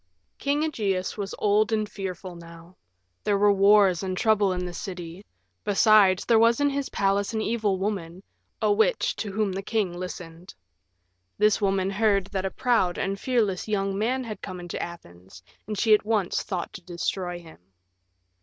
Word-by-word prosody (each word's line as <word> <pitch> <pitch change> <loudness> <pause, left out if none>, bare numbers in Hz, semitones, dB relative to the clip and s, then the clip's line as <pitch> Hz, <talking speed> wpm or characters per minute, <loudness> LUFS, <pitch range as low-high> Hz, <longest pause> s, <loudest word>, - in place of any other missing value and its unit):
King 285 +2 0
Ægeus 200 -11 -1
was 200 -2 -5
old 210 +2 +2
and 215 -1 0
fearful 185 -3 -6
now: 170 +1 -13 0.5
there 205 -1 +2
were 205 +1 +4
wars 200 -2 +5
and 185 -1 -3
troubles 205 -3 +2
in 180 0 -3
the 180 - -6
city; 175 0 -7 0.4
besides, 205 -2 +4
there 230 -2 +4
was 230 +2 +4
in 285 0 +2
his 280 0 -3
palace 200 +2 0
an 220 - 0
evil 215 -3 0
woman, 190 -2 -4 0.4
a - - +4
witch, 450 +3 +1
to 205 - -4
whom 210 0 0
the 190 +1 -4
king 200 -3 -1
listened. 175 -1 -8 0.8
This 210 +1 +3
woman 195 -1 +1
heard 200 -2 +2
that 195 -2 -2
a - - 0
proud 205 -7 +1
and 195 0 -2
fearless 220 -8 0
young 195 -2 -1
man 245 +6 0
had 215 -5 -7
come 180 - -7
into 175 -1 -5
Athens, 95 - -10 0.2
and 210 -1 -4
she 220 +2 +4
at 210 - +4
once 210 -4 0
thought 180 -3 -4
to - - -9
destroy 175 0 -3
him. 165 -2 -14
195 Hz, 175 wpm, -26 LUFS, 185-215 Hz, 0.8 s, wars